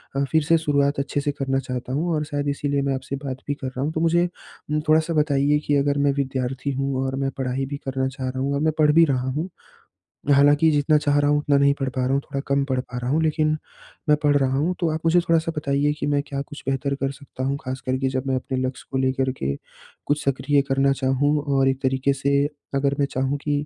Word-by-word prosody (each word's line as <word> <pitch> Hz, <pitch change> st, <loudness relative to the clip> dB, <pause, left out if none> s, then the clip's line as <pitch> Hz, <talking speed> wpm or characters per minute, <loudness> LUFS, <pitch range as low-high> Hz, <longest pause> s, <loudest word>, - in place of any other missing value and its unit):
अ, 140 Hz, -, +1 dB
फिर 160 Hz, -1 st, +3 dB
से 165 Hz, +2 st, +4 dB
शुरुआत 140 Hz, -2 st, +1 dB
अच्छे 145 Hz, +1 st, -1 dB
से 145 Hz, +1 st, 0 dB
करना 135 Hz, -1 st, -1 dB
चाहता 125 Hz, -1 st, -5 dB
हूँ 165 Hz, +5 st, 0 dB
और 150 Hz, -, 0 dB
शायद 145 Hz, -1 st, -3 dB
इसीलिए 140 Hz, 0 st, -1 dB
मैं 135 Hz, -1 st, 0 dB
आपसे 130 Hz, +1 st, -5 dB
बात 130 Hz, -1 st, -3 dB
भी 145 Hz, -, 0 dB
कर 130 Hz, -, -6 dB
रहा 130 Hz, 0 st, -5 dB
हूँ, 150 Hz, +3 st, 0 dB
तो 160 Hz, -, -1 dB
मुझे 170 Hz, +1 st, +3 dB, 0.6 s
थोड़ा-सा 160 Hz, +2 st, +3 dB
बताइए 150 Hz, -1 st, +2 dB
कि 145 Hz, -, +3 dB
अगर 140 Hz, 0 st, +1 dB
मैं 140 Hz, 0 st, +3 dB
विद्यार्थी 130 Hz, 0 st, -2 dB
हूँ 135 Hz, 0 st, -1 dB
और 130 Hz, -, -2 dB
मैं 135 Hz, 0 st, -1 dB
पढ़ाई 130 Hz, 0 st, -1 dB
भी 140 Hz, +1 st, -5 dB
करना 130 Hz, 0 st, 0 dB
चाह 130 Hz, -1 st, -4 dB
रहा 130 Hz, -, -4 dB
हूँ 140 Hz, +1 st, 0 dB
और -, -, 0 dB
मैं 160 Hz, -1 st, +2 dB
पढ़ 150 Hz, -1 st, +5 dB
भी 165 Hz, +1 st, +7 dB
रहा 130 Hz, -2 st, 0 dB
हूँ। 155 Hz, +7 st, -3 dB, 0.8 s
हालाँकि, 145 Hz, +3 st, +5 dB
जितना 150 Hz, +1 st, +3 dB
चाह 145 Hz, -1 st, +2 dB
रहा 145 Hz, 0 st, +2 dB
हूँ 145 Hz, -, +3 dB
उतना 145 Hz, -1 st, +2 dB
नहीं 140 Hz, 0 st, +4 dB
पढ़ 135 Hz, -, -1 dB
पा 130 Hz, 0 st, -3 dB
रहा 130 Hz, -, 0 dB
हूँ, 140 Hz, -, +1 dB
थोड़ा 140 Hz, 0 st, -5 dB
कम 140 Hz, 0 st, +2 dB
पढ़ 130 Hz, -1 st, +1 dB
पा 125 Hz, -1 st, -9 dB
रहा 125 Hz, -, -3 dB
हूँ, 155 Hz, -, +2 dB
लेकिन 155 Hz, 0 st, +1 dB, 0.5 s
मैं 150 Hz, -, +6 dB
पढ़ 145 Hz, -1 st, +4 dB
रहा 135 Hz, -1 st, +1 dB
हूँ। 165 Hz, +6 st, +1 dB
तो 170 Hz, -, +1 dB
आप 160 Hz, -, -2 dB
मुझे 170 Hz, +2 st, +5 dB
थोड़ा-सा 165 Hz, -1 st, +1 dB
बताइए 145 Hz, 0 st, +1 dB
कि -, -, -1 dB
मैं 145 Hz, -1 st, +2 dB
क्या 140 Hz, -1 st, -3 dB
कुछ 145 Hz, +1 st, -10 dB
बेहतर 140 Hz, +1 st, -1 dB
कर 135 Hz, 0 st, -2 dB
सकता 135 Hz, -1 st, -8 dB
हूँ, 140 Hz, +1 st, 0 dB
खास 130 Hz, -1 st, -5 dB
कर 130 Hz, 0 st, +1 dB
के 135 Hz, 0 st, 0 dB
जब 130 Hz, +1 st, -3 dB
मैं 130 Hz, -, +1 dB
अपने 130 Hz, 0 st, -3 dB
लक्ष्य 130 Hz, -, -8 dB
को 135 Hz, -, -1 dB
लेकर 130 Hz, 0 st, +1 dB
के 70 Hz, +1 st, -1 dB, 0.5 s
कुछ 150 Hz, +1 st, 0 dB
सक्रिय 140 Hz, +1 st, +2 dB
करना 135 Hz, +1 st, +3 dB
चाहूँ 135 Hz, +3 st, +1 dB
और 135 Hz, -2 st, +2 dB
एक 135 Hz, 0 st, -2 dB
तरीके 135 Hz, +1 st, +1 dB
से 140 Hz, +1 st, +1 dB, 0.3 s
अगर 140 Hz, 0 st, +1 dB
मैं 140 Hz, -, +3 dB
चाहूँ 135 Hz, +2 st, -1 dB
कि 150 Hz, -, -1 dB
140 Hz, 250 wpm, -23 LUFS, 135-145 Hz, 0.8 s, भी